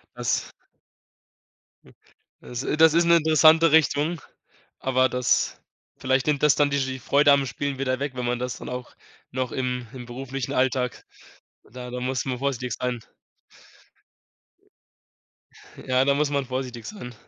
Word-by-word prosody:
Das -, -, -2 dB, 1.3 s
hm, 65 Hz, -, -19 dB, 0.5 s
das 125 Hz, +1 st, -6 dB
das 160 Hz, -1 st, +6 dB
ist 170 Hz, +1 st, +4 dB
'ne 170 Hz, 0 st, +5 dB
interessante 160 Hz, +1 st, +5 dB
Richtung, 160 Hz, +1 st, +2 dB, 0.6 s
aber 130 Hz, 0 st, +2 dB
das 125 Hz, 0 st, 0 dB, 0.4 s
vielleicht 130 Hz, 0 st, 0 dB
nimmt 150 Hz, -2 st, 0 dB
das 150 Hz, -1 st, +5 dB
dann 145 Hz, -1 st, +3 dB
dir 140 Hz, 0 st, 0 dB
die 130 Hz, 0 st, -3 dB
Freude 145 Hz, +4 st, +4 dB
am 140 Hz, -1 st, +3 dB
Spielen 140 Hz, +1 st, -4 dB
wieder 130 Hz, -1 st, -1 dB
weg, 140 Hz, -1 st, -2 dB
wenn 125 Hz, -1 st, -3 dB
man 120 Hz, 0 st, -1 dB
das 125 Hz, 0 st, -3 dB
dann -, -, -8 dB
auch 125 Hz, 0 st, -7 dB, 0.4 s
noch 130 Hz, -1 st, -3 dB
im 125 Hz, -1 st, -2 dB
im 125 Hz, -2 st, -9 dB
beruflichen 130 Hz, +1 st, -5 dB
Alltag 130 Hz, -1 st, 0 dB, 0.7 s
da 125 Hz, 0 st, -8 dB
da 125 Hz, -, -4 dB
muss 130 Hz, -1 st, -2 dB
man 130 Hz, -2 st, -3 dB
vorsichtig 125 Hz, -3 st, -2 dB
sein. 125 Hz, -1 st, -2 dB, 2.9 s
Ja, 130 Hz, 0 st, +3 dB
da 140 Hz, 0 st, +3 dB
muss 145 Hz, 0 st, 0 dB
man 140 Hz, -1 st, 0 dB
vorsichtig 125 Hz, -3 st, -5 dB
sein. 155 Hz, -, -8 dB
130 Hz, 150 wpm, -24 LUFS, 125-145 Hz, 2.9 s, das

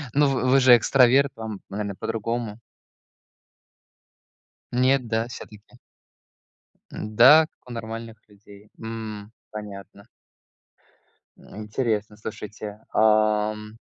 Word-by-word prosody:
Ну, 145 Hz, 0 st, +4 dB
вы 130 Hz, -1 st, -1 dB
вы 135 Hz, +2 st, +5 dB
же 125 Hz, -2 st, +7 dB
экстраверт. 130 Hz, +3 st, +4 dB
Вам, 110 Hz, -3 st, -7 dB
наверное, 100 Hz, 0 st, -4 dB
по-другому. 115 Hz, +1 st, -4 dB, 2.1 s
Нет, 130 Hz, +1 st, +2 dB
да, 115 Hz, +1 st, -1 dB
всё-таки? 110 Hz, 0 st, -12 dB, 1.1 s
М-да, 120 Hz, +9 st, +5 dB
как 125 Hz, -, -23 dB
у -, -, -8 dB
нормальных 115 Hz, 0 st, -7 dB
людей. 100 Hz, 0 st, -18 dB
М, 110 Hz, -2 st, -7 dB, 0.2 s
понятно. 100 Hz, -1 st, -10 dB, 1.3 s
Интересно, 110 Hz, 0 st, -4 dB
слушайте. 105 Hz, 0 st, -8 dB
Ам 105 Hz, 0 st, +2 dB
110 Hz, 90 wpm, -24 LUFS, 105-120 Hz, 2.1 s, же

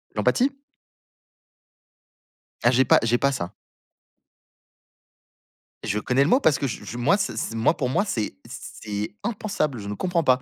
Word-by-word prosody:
L'empathie? 275 Hz, +2 st, +2 dB, 2.1 s
Ah 120 Hz, -, +5 dB
j'ai 130 Hz, +1 st, +4 dB
pas -, -, +6 dB
j'ai 115 Hz, +1 st, +3 dB
pas 140 Hz, +2 st, +2 dB
ça. 115 Hz, -10 st, -4 dB, 2.3 s
Je 105 Hz, -, -1 dB
connais 125 Hz, +5 st, +2 dB
le 145 Hz, -, +1 dB
mot 255 Hz, -, +5 dB
parce 155 Hz, -, +3 dB
que 140 Hz, -, -1 dB
je 120 Hz, -, -6 dB
je 120 Hz, -, -7 dB
moi 135 Hz, +11 st, +3 dB
c 205 Hz, 0 st, -1 dB
c'est 115 Hz, -, -3 dB
moi 115 Hz, +8 st, +2 dB
pour 130 Hz, -4 st, -1 dB
moi 165 Hz, -, +2 dB
c'est 110 Hz, -, -2 dB
c'est 105 Hz, -5 st, -6 dB
impensable, 200 Hz, -, -2 dB
je 100 Hz, -, -7 dB
ne 105 Hz, -, -3 dB
comprends 170 Hz, -, 0 dB
pas, 130 Hz, -2 st, +3 dB
130 Hz, 160 wpm, -24 LUFS, 115-170 Hz, 2.3 s, pas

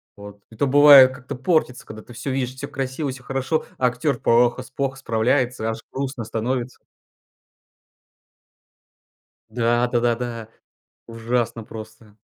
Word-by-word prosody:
Вот. 100 Hz, 0 st, -12 dB
Это 115 Hz, +5 st, -2 dB
бывает, 140 Hz, -1 st, +8 dB
как-то 130 Hz, +2 st, -8 dB
портится, 130 Hz, -2 st, 0 dB
когда 110 Hz, 0 st, -10 dB
ты 120 Hz, -, -14 dB
всё 125 Hz, +4 st, -5 dB
видишь, 130 Hz, -1 st, -2 dB
всё -, -, -6 dB
красиво, 135 Hz, +2 st, -4 dB
всё 130 Hz, -1 st, -11 dB
хорошо, 135 Hz, +4 st, -2 dB
а 125 Hz, -, +2 dB
актёр 125 Hz, +1 st, -1 dB
плохо 120 Hz, +2 st, +2 dB
плохо 135 Hz, -1 st, -2 dB
справляется, 120 Hz, -1 st, 0 dB
аж 115 Hz, -, -4 dB
грустно 135 Hz, -2 st, -4 dB
становится. 120 Hz, +3 st, -3 dB, 2.7 s
Да, 120 Hz, +1 st, +1 dB
да-да-да, 120 Hz, -2 st, -2 dB, 0.6 s
ужасно 115 Hz, 0 st, -2 dB
просто! 110 Hz, -1 st, -12 dB
125 Hz, 120 wpm, -22 LUFS, 115-130 Hz, 2.7 s, бывает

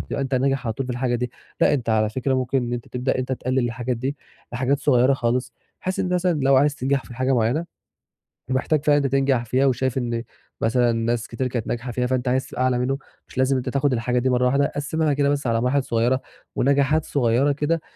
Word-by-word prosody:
تبقى -, -, -4 dB
أنت 135 Hz, 0 st, -2 dB
ناجح 135 Hz, -1 st, +1 dB
على 110 Hz, -, 0 dB
طول 130 Hz, +3 st, -4 dB
في 125 Hz, -, -3 dB
الحاجة 120 Hz, 0 st, -1 dB
دي، 125 Hz, 0 st, -2 dB, 0.3 s
لأ -, -, +4 dB
أنت 120 Hz, -4 st, -3 dB
على 110 Hz, -1 st, +3 dB
فكرة 130 Hz, +3 st, -1 dB
ممكن 130 Hz, +1 st, 0 dB
إن 120 Hz, 0 st, -3 dB
أنت 120 Hz, -1 st, -4 dB
تبدأ 125 Hz, +1 st, -1 dB
إن -, -, -2 dB
أنت 130 Hz, +1 st, -2 dB
تقلّل 130 Hz, +1 st, -1 dB
الحاجات 120 Hz, 0 st, -1 dB
دي 135 Hz, +4 st, -3 dB, 0.4 s
لحاجات 130 Hz, +3 st, +1 dB
صغيرة 130 Hz, -2 st, +3 dB
خالص، 125 Hz, 0 st, -1 dB, 0.3 s
بحيث 185 Hz, 0 st, -3 dB
إن 180 Hz, -, -1 dB
مثلًا 175 Hz, -4 st, +1 dB
لو 135 Hz, 0 st, +4 dB
عايز 145 Hz, +1 st, +3 dB
تنجَح 135 Hz, +1 st, 0 dB
في 120 Hz, -, -11 dB
حاجة 130 Hz, +2 st, 0 dB
معينة 120 Hz, +8 st, +1 dB, 0.9 s
ومحتاج 140 Hz, +3 st, +1 dB
فعلًا 145 Hz, -1 st, +5 dB
إن 145 Hz, -, +1 dB
أنت 135 Hz, -, -1 dB
تنجَح 135 Hz, -3 st, +2 dB
فيها 130 Hz, +4 st, +2 dB
وشايف 130 Hz, 0 st, +1 dB
إن 120 Hz, -2 st, -2 dB, 0.4 s
مثلًا 120 Hz, +1 st, +3 dB
ناس 115 Hz, 0 st, -1 dB
كتير 125 Hz, +2 st, -2 dB
كانت 120 Hz, -3 st, -3 dB
ناجحة 120 Hz, +1 st, -3 dB
فيها 125 Hz, +1 st, -1 dB
فأنت 130 Hz, 0 st, -1 dB
عايز 130 Hz, +1 st, +1 dB
تبقى 130 Hz, -, -3 dB
أعلى 125 Hz, -1 st, +2 dB
منُّه، 135 Hz, +2 st, 0 dB, 0.3 s
مش -, -, -15 dB
لازم 130 Hz, +1 st, +2 dB
أنت 125 Hz, -, -3 dB
تاخد 140 Hz, -1 st, +1 dB
الحاجة 125 Hz, +1 st, 0 dB
دي 130 Hz, +1 st, +1 dB
مرّة 125 Hz, 0 st, +2 dB
واحدة، 140 Hz, +2 st, +2 dB
قسِّمها 150 Hz, +1 st, 0 dB
كده 140 Hz, 0 st, +2 dB
مثلًا 140 Hz, -5 st, 0 dB
على 115 Hz, -, +1 dB
مراحل 130 Hz, +2 st, +1 dB
صغيّرة 120 Hz, +3 st, +1 dB, 0.3 s
ونجاحات 140 Hz, +3 st, +2 dB
صغيّرة 130 Hz, +1 st, +2 dB
كده، 150 Hz, +3 st, 0 dB
130 Hz, 230 wpm, -23 LUFS, 120-140 Hz, 0.9 s, فعلًا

